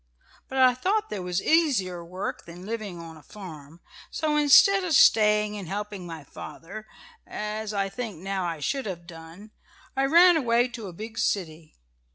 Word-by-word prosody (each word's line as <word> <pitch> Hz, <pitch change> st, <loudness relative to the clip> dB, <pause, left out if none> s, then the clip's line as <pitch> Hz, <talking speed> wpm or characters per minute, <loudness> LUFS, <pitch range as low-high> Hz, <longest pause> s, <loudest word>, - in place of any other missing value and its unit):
But 265 Hz, -, -6 dB
I 255 Hz, -1 st, +6 dB
thought 400 Hz, -, -1 dB
there 205 Hz, -, -4 dB
was 180 Hz, +1 st, -2 dB
easier 220 Hz, -, +1 dB
work 180 Hz, +3 st, -6 dB
than 175 Hz, +2 st, -11 dB
living 210 Hz, -5 st, -5 dB
on 165 Hz, -1 st, -10 dB
a -, -, -15 dB
farm, 165 Hz, -5 st, -12 dB, 0.3 s
so, 305 Hz, -1 st, -1 dB
instead 300 Hz, +7 st, +6 dB
of 345 Hz, -3 st, -1 dB
staying 210 Hz, -3 st, +4 dB
and 200 Hz, -4 st, -7 dB
helping 205 Hz, -1 st, -5 dB
my 165 Hz, -3 st, -8 dB
father, 200 Hz, +9 st, -10 dB, 0.4 s
as 215 Hz, 0 st, -4 dB
I 200 Hz, -2 st, -1 dB
think 220 Hz, -2 st, -6 dB
now 190 Hz, +1 st, -3 dB
I 165 Hz, -3 st, -4 dB
should 265 Hz, -, -2 dB
have 175 Hz, -3 st, -6 dB
done, 170 Hz, +5 st, -12 dB, 0.4 s
I 270 Hz, -, +2 dB
ran 340 Hz, +4 st, +6 dB
away 240 Hz, -3 st, +2 dB
to 230 Hz, -4 st, -8 dB
a 180 Hz, -, -9 dB
big 220 Hz, +5 st, -8 dB
city. 160 Hz, -5 st, -2 dB
205 Hz, 175 wpm, -26 LUFS, 175-245 Hz, 0.4 s, I